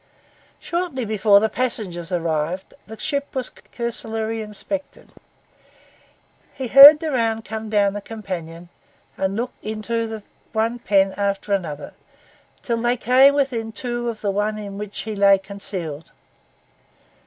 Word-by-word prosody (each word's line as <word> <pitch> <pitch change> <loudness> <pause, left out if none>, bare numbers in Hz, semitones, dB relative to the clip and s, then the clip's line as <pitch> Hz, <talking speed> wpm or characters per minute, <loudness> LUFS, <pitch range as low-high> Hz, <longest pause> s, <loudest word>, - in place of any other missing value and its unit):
Shortly 340 -8 -3
before 210 -1 +4
the 220 - +2
passengers 200 -8 -3
arrived, 170 +1 -2
the 220 +1 -9
ship 280 +1 -2
was 255 -1 -2
cursorily 225 -1 -3
inspected. 215 +7 -5 1.4
He 260 -3 -5
heard 285 +4 +11
the 315 -1 -3
round 225 -3 0
come 220 0 -6
down 205 -2 +2
the 205 - -5
companion 175 -6 -7 0.5
and 190 +1 -2
look 240 +3 -3
into 220 0 -3 0.3
one 225 +2 0
pen 195 -3 +2
after 200 0 -1
another, 160 -7 -3 0.6
until 230 -2 -3
they 240 +1 +1
came 260 +4 +5
within 245 -6 -1
two 240 +1 -3
of 220 -2 -7
the 200 - 0
one 210 +2 -1
in 200 -1 -7
which 210 -1 -6
he 220 -1 -5
lay 200 -1 +5
concealed. 190 -6 -4
220 Hz, 130 wpm, -22 LUFS, 195-240 Hz, 1.4 s, heard